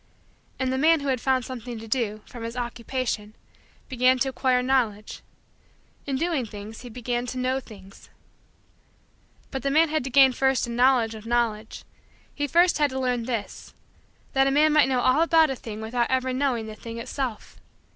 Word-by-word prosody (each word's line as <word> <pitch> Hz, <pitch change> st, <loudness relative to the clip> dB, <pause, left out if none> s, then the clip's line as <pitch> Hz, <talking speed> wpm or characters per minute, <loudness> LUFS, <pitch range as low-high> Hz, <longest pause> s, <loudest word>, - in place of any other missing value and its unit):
And 260 Hz, -1 st, -1 dB
the 260 Hz, -, -1 dB
man 320 Hz, +1 st, +4 dB
who 280 Hz, -, -2 dB
had 255 Hz, -3 st, 0 dB
found 260 Hz, -2 st, +1 dB
something 245 Hz, -2 st, -7 dB
to 225 Hz, +1 st, -9 dB
do, 215 Hz, -3 st, -1 dB
from 240 Hz, -, -11 dB
his 230 Hz, +2 st, -6 dB
Occupation, 235 Hz, -3 st, -3 dB, 0.5 s
began 255 Hz, 0 st, +3 dB
to 270 Hz, +1 st, 0 dB
acquire 255 Hz, -1 st, +1 dB
Knowledge. 235 Hz, -6 st, -1 dB, 0.9 s
In 275 Hz, -, -1 dB
doing 320 Hz, -1 st, 0 dB
things, 210 Hz, 0 st, -9 dB
he 245 Hz, -, -9 dB
began 240 Hz, +1 st, -3 dB
to 255 Hz, -, -5 dB
know 255 Hz, +1 st, 0 dB
things. 200 Hz, -6 st, -15 dB, 1.4 s
But 270 Hz, -, -4 dB
the 275 Hz, -, -1 dB
man 315 Hz, +3 st, +4 dB
had 310 Hz, -3 st, 0 dB
to -, -, -3 dB
gain 265 Hz, 0 st, +6 dB
first 265 Hz, 0 st, +1 dB
a 240 Hz, -, -7 dB
knowledge 245 Hz, -2 st, +3 dB
of 220 Hz, 0 st, -10 dB
Knowledge. 230 Hz, -2 st, -1 dB, 0.5 s
He 290 Hz, -, -2 dB
first 345 Hz, +3 st, +3 dB
had 295 Hz, -1 st, +3 dB
to 265 Hz, 0 st, -4 dB
learn 250 Hz, -2 st, -1 dB
this: 230 Hz, -4 st, -5 dB, 0.6 s
that 270 Hz, 0 st, +3 dB
a -, -, +3 dB
man 300 Hz, +2 st, +4 dB
might 300 Hz, -3 st, +5 dB
know 255 Hz, -2 st, +1 dB
all 255 Hz, +5 st, +3 dB
about 325 Hz, -3 st, +4 dB
a -, -, -2 dB
thing 220 Hz, -3 st, -8 dB
without 235 Hz, +2 st, -1 dB
ever 260 Hz, 0 st, 0 dB
knowing 255 Hz, -4 st, 0 dB
the 215 Hz, -, -7 dB
thing 230 Hz, +2 st, -9 dB
itself. 235 Hz, -1 st, -5 dB
255 Hz, 185 wpm, -25 LUFS, 230-270 Hz, 1.4 s, gain